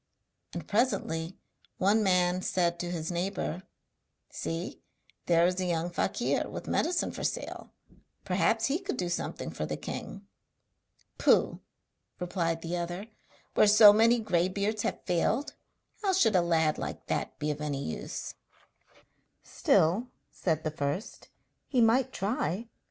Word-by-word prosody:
And - - -5
presently 190 -7 0 0.4
one 205 +4 +3
man 180 -2 +2
said 175 -2 0
to 175 - -3
his 165 -1 -3
neighbour: 175 0 -2 0.7
'See, 165 +4 -4 0.5
there 170 0 +5
is 180 +1 +1
a 185 - 0
young 170 0 -1
fakir - - 0
with - - -6
medicine 345 +2 0
for - - -7
sale, - - -3 0.6
perhaps 220 +4 +2
he 285 +7 +1
could 390 -8 -4
do 180 -1 -1
something 175 - -3
for - - -4
the - - -3
king.' 200 0 -7 0.9
'Pooh!' - - +3 0.6
replied 170 -2 -1
the 170 +1 -2
other, 175 +5 -4 0.4
'where - - +5
so 210 0 +9
many 230 +3 +5
grey 185 -6 +1
beards 205 +3 -1
have - - -3
failed, 205 - 0 0.5
how 390 -3 +1
should 225 - +3
a 180 - +5
lad 160 -3 +2
like - - -5
that - - -2
be 150 0 -1
of 150 0 -5
any 145 -2 -2
use?' 80 - -5 1.1
'Still,' 185 +10 +2 0.2
said 160 -3 -1
the 155 - -1
first, 145 +6 -4 0.4
'he 260 - +1
might 235 +2 +4
try.' 200 +1 -2
180 Hz, 140 wpm, -29 LUFS, 170-215 Hz, 1.1 s, so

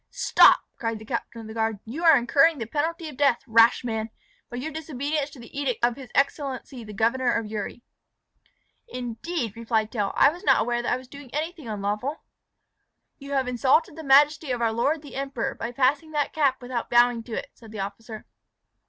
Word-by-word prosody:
"Stop!" - - +5 0.2
cried 225 -2 -2
the 215 - -12
captain 235 0 -4
of 220 - -10
the 220 - -8
guard; 220 -1 -1
"you 275 +10 -6
are 325 -3 +7
incurring 275 +7 +3
the 230 - -4
penalty 320 - -2
of 295 -4 -9
death, 275 -4 +2
rash 230 0 +5
man, 220 -2 -3 0.4
by 245 - -6
your 290 +6 -4
disobedience 295 -1 -3
to 275 - -14
the 235 - -13
edict 265 -4 0
of 240 -1 0
his 260 -3 -11
excellency 275 -2 -1
the 210 - -10
Governor 235 +4 +1
of 225 - -1
Uri." 215 +2 -6 1.0
"Indeed!" 245 - -4
replied 225 -2 -1
Tell. 205 -4 -1
"I 280 - +6
was 350 +4 -11
not - - +4
aware 240 +1 0
that 240 - -2
I - - +2
was 255 0 -12
doing 280 0 -12
anything 315 -2 -4
unlawful." 210 +7 -3 1.0
"You 280 0 -7
have 265 -2 +1
insulted 260 +5 +2
the 320 - -8
majesty 290 +2 +4
of 250 -1 -1
our 230 -1 +1
lord 290 +7 0
the 285 - -11
Emperor 270 -3 -3
by 235 - -5
passing 275 +5 +1
that 295 -1 -1
cap 275 -5 +1
without 245 -1 -4
bowing 240 -1 +4
to 235 - -8
it," - - -5
said 225 -2 -15
the 215 -3 -5
officer. 215 +3 -7
250 Hz, 200 wpm, -25 LUFS, 230-285 Hz, 1.0 s, are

